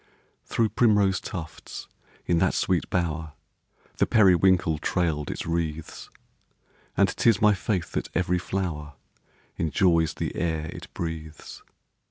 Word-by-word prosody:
Through 115 -2 +1
primrose 105 -3 +3
tufts, 85 -5 -7 0.4
in 85 -1 +2
that 90 +1 +2
sweet 90 -3 0
bower, 80 -3 -2 0.6
The - - +2
periwinkle 95 -5 +4
trail'd 80 -4 -1
its - - -4
wreaths; 80 -2 -3 0.9
And - - +5
'tis 115 -4 +3
my 105 -1 +5
faith 95 -2 -2
that - - -3
every 90 0 +1
flower 85 -6 -3 0.6
Enjoys 85 -1 +2
the - - -3
air 80 -1 -2
it - - -10
breathes. 80 -2 -6
85 Hz, 120 wpm, -26 LUFS, 80-95 Hz, 0.9 s, And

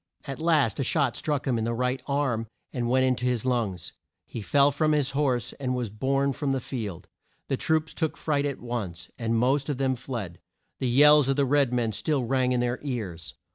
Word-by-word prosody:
At 135 +1 -6
last 155 -9 +2
a - - +1
shot 140 -1 +1
struck 145 -3 -2
him 125 -4 +1
in - - -1
the 115 +1 -1
right 125 +2 -1
arm 135 -6 0 0.3
and 120 -2 -1
went 130 +1 +3
in 130 -1 +2
to 125 - -3
his 125 -1 0
lungs. 115 -9 -1 0.3
He 115 - -7
fell 140 +6 +4
from 155 +2 +1
his 145 -2 +1
horse, 135 -4 0
and 130 -2 -1
was 120 -5 -3
borne 135 +5 0
from 140 0 -1
the 135 - 0
field. 110 -9 -6 0.4
The 135 - 0
troops 160 +2 0
took 160 -1 -2
fright 145 -2 0
at 140 - -4
once, 115 -8 -5
and 115 -1 0
most 135 +4 +1
of 145 - -1
them 135 -1 +1
fled. 115 -9 -6 0.4
The 130 - 0
yells 145 +2 +6
of 135 - +2
the 140 0 +2
red 140 -1 +3
men 120 -3 0
still 130 +7 0
rang 130 +1 +1
in 125 -1 +1
their 125 +1 -1
ears. 100 - -5
130 Hz, 215 wpm, -26 LUFS, 120-140 Hz, 0.4 s, yells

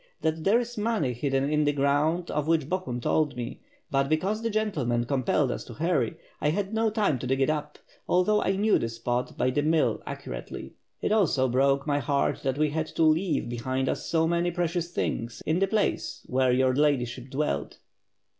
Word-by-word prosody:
"That 160 0 -1
there 210 +5 +5
is 240 -2 -5
money 205 - 0
hidden 135 +2 0
in 150 +1 +2
the 145 - +3
ground 145 +5 +1
of 150 0 -1
which 160 -4 +2
Bo 185 +4 0
hun 125 -9 -5
told 150 +3 +1
me. 120 -1 -5 0.3
But 135 0 +1
because 190 +8 0
the 230 - -1
gentlemen 155 - 0
compelled 130 +1 +1
us - - -4
to 120 - -10
hurry, 155 -7 0 0.3
I 150 - +2
had 195 +5 -1
no 225 0 +2
time 205 - +1
to 125 - -4
dig 135 +1 +1
it 135 +3 +3
up, 150 -1 -4 0.3
although 195 +4 +3
I 190 - +1
knew 210 +2 +3
the 115 - -2
spot 120 +2 -3
by 130 - +2
the 145 - +1
mill 150 -7 +2
accurately. - - -7 0.3
It - - +1
also 170 -11 +3
broke 135 +2 +2
my 145 -1 +1
heart 140 +1 0
that 135 0 -1
we 150 -1 +2
had 160 +1 -1
to 165 - -1
leave 160 +3 +2
behind 130 +3 -2
us - - -2
so 160 -1 +2
many 170 +1 +1
precious 175 0 -1
things 115 -8 -3
in 160 +3 +1
the 195 - +2
place 215 +1 -1
where 130 0 +2
your 130 +1 +3
Ladyship 130 -3 0
dwelt." 130 - -2
150 Hz, 200 wpm, -27 LUFS, 130-175 Hz, 0.3 s, there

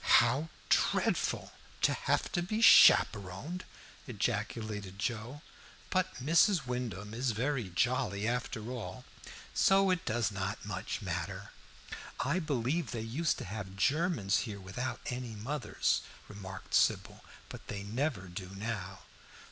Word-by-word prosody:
"How 130 +7 +2 0.2
dreadful, - - +1 0.3
to - - +5
have - - 0
to 175 - 0
be 215 +5 -2
chaperoned!" 130 - +6 0.4
ejaculated 105 -3 -3
Joe. 120 +7 -3 0.5
"But 185 0 +1
Mrs. 165 +4 +3
Wyndham 115 -5 -4
is 120 0 0
very 125 -2 -1
jolly 100 0 0
after 120 -1 -2
all, 125 +1 -6 0.5
so 195 0 +4
it 180 -2 0
does 110 0 0
not 95 +1 -4
much 100 -3 -4
matter." - - -4 0.7
"I 145 +8 +1
believe 150 0 -1
they 115 - -3
used 135 +8 0
to - - -6
have 95 -1 -6
Germans 140 - +2
here 100 -1 -6
without 95 +7 -4
any 125 -2 -4
mothers," 135 +8 -1 0.3
remarked 95 -2 -9
Sybil, - - +2 0.2
"but - - -10
they 100 -1 -5
never 120 +2 -1
do 90 +1 -7
now." 100 -3 -4
115 Hz, 125 wpm, -32 LUFS, 100-140 Hz, 0.7 s, chaperoned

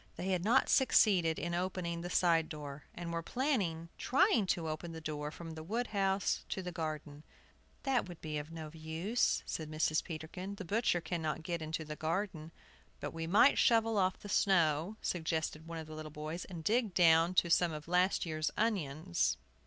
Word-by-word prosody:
They 185 - -3
had 180 -2 +1
not 240 +6 +4
succeeded 190 - +4
in 170 0 -3
opening 175 -1 -2
the 175 - -5
side 165 -3 +3
door, 145 -2 -7
and 170 -1 -5
were 165 - -1
planning 185 - -1
trying 265 - +3
to 170 -3 0
open 160 +2 -4
the 160 - -6
door 150 -1 -4
from 165 +1 -8
the 160 0 -7
wood 225 +9 -2
house 195 -1 +1
to 190 - -3
the 180 - -4
garden. 155 -3 -5 0.6
"That 265 -7 +1
would 175 - -9
be 155 -1 -3
of 145 +1 -7
no 160 -2 -7
use," 165 +8 0
said 155 -1 -4
Mrs. 155 0 +1
Peterkin, 180 +4 -6
"the 200 - -7
butcher 200 -2 +1
cannot 160 -2 -3
get 170 0 -3
into 155 0 -3
the 150 0 -6
garden." 165 0 -2 0.5
"But 145 +1 -5
we 165 0 -4
might 210 +10 +5
shovel 225 -2 +4
off 185 -1 +2
the - - -10
snow," 175 -1 +2
suggested 160 -2 -2
one 165 0 -5
of 160 - -6
the 155 - -10
little 155 0 -7
boys, 155 +3 -5
"and 170 -4 -8
dig 220 0 +1
down 165 0 +5
to 170 -1 +3
some 170 0 +4
of 150 0 -7
last 180 +2 +2
year's 155 -2 -1
onions." 145 - 0
170 Hz, 190 wpm, -34 LUFS, 155-190 Hz, 0.6 s, might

